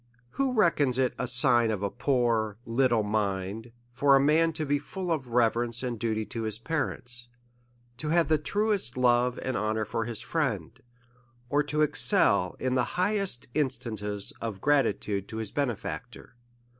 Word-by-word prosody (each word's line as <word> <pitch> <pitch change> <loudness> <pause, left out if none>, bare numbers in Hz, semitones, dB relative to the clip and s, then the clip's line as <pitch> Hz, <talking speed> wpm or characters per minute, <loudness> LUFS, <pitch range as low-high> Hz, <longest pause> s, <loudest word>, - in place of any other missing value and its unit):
Who 270 -2 -1
reckons 150 - +2
it 130 -1 +1
a 125 - -1
sign 120 -1 +5
of 105 -2 -2
a 100 - -1
poor, 115 -6 0
little 120 -2 +2
mind, 105 +1 -2 0.2
for 140 +2 +4
a - - +5
man 155 +4 +3
to 155 0 -3
be 145 0 +1
full 180 +4 -5
of 145 -6 -2
reverence 120 0 +1
and 120 -3 -3
duty 110 -1 -1
to 115 - -5
his 110 -1 -2
parents, 120 -3 -3 0.7
to 150 +6 -3
have 170 +1 +3
the 155 -1 +2
truest 200 - -1
love 125 0 +2
and 130 -1 -2
honour 110 0 -1
for 110 +2 -3
his 115 -2 -1
friend, 130 - -3 0.7
or 145 +3 +2
to 150 +1 0
excel 90 - +4
in 130 0 -1
the 125 -1 +2
high 205 +4 +1
est 185 -12 -2
instances 110 -8 -2
of 110 -4 -4
gratitude 105 -7 +1
to 110 - -7
his 110 -2 -3
benefactor? 125 -2 -5
125 Hz, 165 wpm, -27 LUFS, 110-145 Hz, 0.7 s, sign